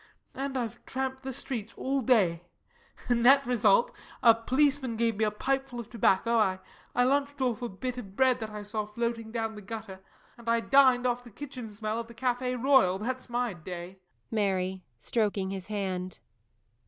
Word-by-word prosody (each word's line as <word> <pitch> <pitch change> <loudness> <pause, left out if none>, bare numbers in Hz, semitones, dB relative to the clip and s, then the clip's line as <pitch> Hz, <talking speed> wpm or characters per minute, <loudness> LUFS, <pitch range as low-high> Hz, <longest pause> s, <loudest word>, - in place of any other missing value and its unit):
And 270 0 -3
I've 235 -4 -4
tramped 265 0 -3
the 265 0 -4
streets 235 -4 -5
all 270 +1 0
day. 200 -9 +3 0.7
Net 245 +3 +5
result, 235 -3 +3 0.3
a 230 -2 +9
policeman 260 +2 +1
gave 230 -1 +1
me 220 - +2
a - - +2
pipeful 265 +3 -2
of 235 - -8
tobacco, 215 -2 +2 0.4
I 245 - +4
lunched 280 +2 +1
off 250 -3 0
a 240 - -3
bit 250 +6 -4
of 195 -5 -10
bread 260 0 +3
that 220 -1 -4
I 210 -1 -7
saw 210 0 -3
floating 230 +1 -3
down 225 -1 -2
the 210 - -9
gutter 210 -2 -7 0.4
and 230 0 -5
I 230 0 +4
dined 255 0 +5
off 245 0 0
the 240 - -12
kitchen 255 -1 -8
smell 215 +1 -3
of 230 - -5
the 235 - -13
Café 250 +1 -1
Royal. 260 -8 +4
That's 255 +5 -4
my 240 -2 -1
day. 175 +2 -8 0.3
MARY. 190 -3 0 0.2
[_Stroking 205 -4 0
his 190 -1 -6
hand. 185 -3 -3
230 Hz, 175 wpm, -29 LUFS, 210-255 Hz, 0.7 s, a